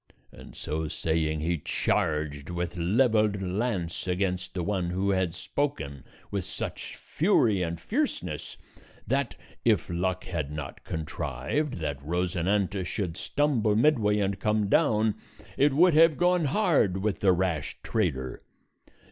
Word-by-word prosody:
And - - -13
so 80 +1 -3
saying 80 -1 -1
he 85 +1 0
charged 75 0 -1
with 85 0 -3
leveled 105 +3 +2
lance 95 -2 -2
against 90 0 -1
the 90 - -1
one 95 -2 -1
who 95 +3 0
had 95 -3 0
spoken, 80 - -3 0.3
with 100 -2 -1
such - - -5
fury 105 -5 +2
and 85 -1 -2
fierceness - - -2 0.5
that, 135 +2 0 0.3
if 105 -7 +2
luck 95 +2 -1
had 80 -5 -3
not 75 -2 -6
contrived 75 - -3
that 70 -5 -4
Rosinante 90 +4 0
should 90 -1 -3
stumble 120 -3 +1
midway 110 -5 +3
and 100 -2 0
come 105 -1 +1
down, 110 0 +3 0.4
it 145 +1 +4
would 170 +5 +5
have 160 -1 +6
gone 180 -2 +3
hard 145 - +2
with 100 +1 -1
the 95 - +4
rash 90 -5 -1
trader. 70 - -1
95 Hz, 130 wpm, -28 LUFS, 85-110 Hz, 0.5 s, have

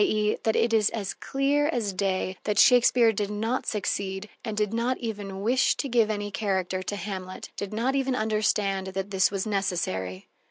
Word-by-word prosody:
e._, 215 - +1
that 220 - +1
it 230 - +2
is 215 -2 +4
as 205 -4 -3
clear 280 +2 0
as 230 -10 -1
day 185 -1 -1
that 210 -1 0
Shakespeare 245 -1 +6
did 205 0 -2
not 225 +5 -2
succeed 200 -1 -2
and 220 -3 -4
did 210 0 0
not 240 +3 0
even 205 -5 -5
wish 255 +4 +3
to 280 - -2
give 230 -4 +3
any 205 -1 -3
character 190 -3 -1
to 195 +2 -4
Hamlet, 185 -1 -6
did 200 - -5
not 235 +5 0
even 270 -1 0
understand 210 -3 0
that 195 +1 -4
this 190 -1 +3
was 195 0 -2
necessary. 165 - -2
210 Hz, 185 wpm, -26 LUFS, 195-230 Hz, -, Shakespeare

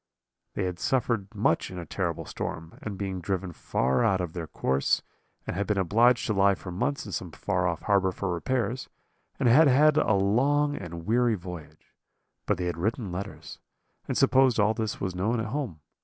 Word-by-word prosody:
"They 100 - -1
had 90 -1 -3
suffered 120 -6 0
much 100 -5 +1
in 90 - -8
a 85 - -5
terrible - - -3
storm, 80 0 -6
and 105 -3 -5
been 95 -2 -3
driven 95 0 -2
far 65 - 0
out 95 -5 +3
of 90 -3 -3
their 85 -3 -5
course, 70 -2 0 0.4
and 100 - -2
been 105 - +1
obliged 115 +6 +3
to 110 - 0
lie 100 0 +4
for 90 - -8
months 120 +10 -2
in 105 - -7
some 90 - -4
far 90 +2 -1
off 85 -2 -3
harbour 100 -2 +2
for 90 0 -3
repairs, 120 +6 -2 0.5
and - - +2
had 145 +7 +7
had 150 +3 +5
a 110 - +3
long 135 +10 +2
and 85 - -7
weary 120 +1 +3
voyage. 85 -5 -10 0.5
But - - +2
they 90 - -2
had 85 -1 -2
written 110 - -2
letters, 100 +3 -7 0.5
and - - -1
supposed 130 -3 +4
all 105 +1 +4
this 110 -1 -3
was 95 -2 -2
known 105 +6 0
at 110 - -2
home. 110 - -4
100 Hz, 190 wpm, -27 LUFS, 90-115 Hz, 0.5 s, had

